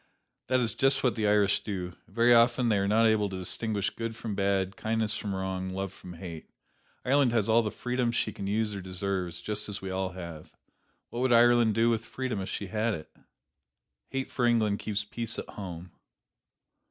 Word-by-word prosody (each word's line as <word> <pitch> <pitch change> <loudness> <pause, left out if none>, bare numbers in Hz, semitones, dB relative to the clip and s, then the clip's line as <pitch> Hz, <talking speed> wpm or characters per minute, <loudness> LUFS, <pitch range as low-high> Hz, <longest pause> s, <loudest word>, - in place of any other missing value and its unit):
That 130 +1 +3
is 115 -3 0
just 135 0 +2
what 125 -4 +3
the 110 -2 0
Irish 105 -1 +3
do. 90 -4 -4
Very 120 +4 +4
often 120 +1 +4
they 105 -3 +3
are 100 - +1
not 110 +3 +4
able 110 -2 +3
to 95 - -5
distinguish 100 +2 -1
good 115 -1 -4
from 110 -2 -5
bad, 100 -1 0
kindness 110 0 0
from 100 -2 -3
wrong, 95 0 -3
love 95 0 -4
from 90 - -10
hate. 85 -2 -8 0.6
Ireland 135 -2 +3
has 110 -4 +2
all 115 +1 +5
the 110 - -1
freedom 125 +1 -1
she 120 - -1
can 100 - -5
use 105 +1 0
or 100 - -5
deserves, 95 -1 -3
just 105 0 -3
as 105 - -4
we 95 -1 -5
all 95 -1 -2
have. 85 -4 -9 0.6
What 120 - -4
would 130 0 +2
Ireland 120 -2 +5
do 115 +1 +4
with 115 -1 0
freedom 120 -2 -3
if 95 - -5
she 100 - -3
had 110 +3 0
it? 80 - -11 0.9
Hate 135 0 -3
for 120 -2 +1
England 110 -4 +2
keeps 105 -1 -2
peace 115 +1 -3
at - - -6
home. 90 -3 -7
105 Hz, 200 wpm, -29 LUFS, 95-115 Hz, 0.9 s, all